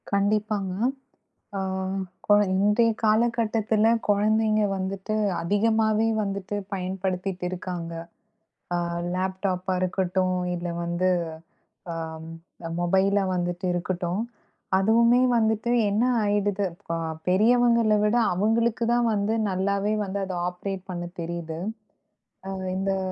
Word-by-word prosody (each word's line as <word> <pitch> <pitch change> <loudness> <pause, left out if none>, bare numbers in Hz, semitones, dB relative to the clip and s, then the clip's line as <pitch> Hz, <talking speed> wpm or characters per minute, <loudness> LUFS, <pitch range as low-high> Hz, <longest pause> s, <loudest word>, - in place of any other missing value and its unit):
கண்டிப்பாங்க. 205 -1 0 0.8
ஓ! - - -1 0.7
கொ - - 0 0.2
இன்றைய 210 +4 +3
காலகட்டத்துல 220 -1 +2 0.2
கொழந்தைங்க 215 +1 +3
வந்துட்டு 190 +2 -3 0.3
அதிகமாவே 220 +3 +2 0.2
வந்துட்டு 200 0 -4 0.2
பயன்படுத்திட்ருக்காங்க. 185 -2 -3 0.8
அ - - +1 0.4
லேப்டாப்பா 185 0 -1
இருக்கட்டும் 185 0 0 0.2
இல்ல 175 0 -4
வந்து, 175 +2 0 0.8
ஆ - - -3 0.7
அ - - -5
மொபைலா 190 +3 +2
வந்துட்டு 175 +1 -2
இருக்கட்டும். 175 +2 -2 0.6
அதுவுமே 230 +5 +4 0.2
வந்துட்டு 220 +1 +1 0.2
என்ன 210 +3 +1 0.2
ஆயிடுது 205 -1 +1
இப்ப 170 -1 -7 0.4
பெரியவங்கள 230 +2 +4
விட 210 +2 +2 0.2
அவுங்களுக்கு 225 +5 +1
தான் 240 -1 +2
வந்து 205 +1 0 0.2
நல்லாவே 200 +2 0
வந்து 200 +1 -3
அத 190 - -5
ஆப்பரேட் 185 +1 -5
பண்ண 175 -1 -4 0.2
தெரியுது. 165 -1 -5 0.9
அ - - -4 0.3
இந்தக் 190 0 -1
195 Hz, 100 wpm, -25 LUFS, 185-215 Hz, 0.9 s, அதுவுமே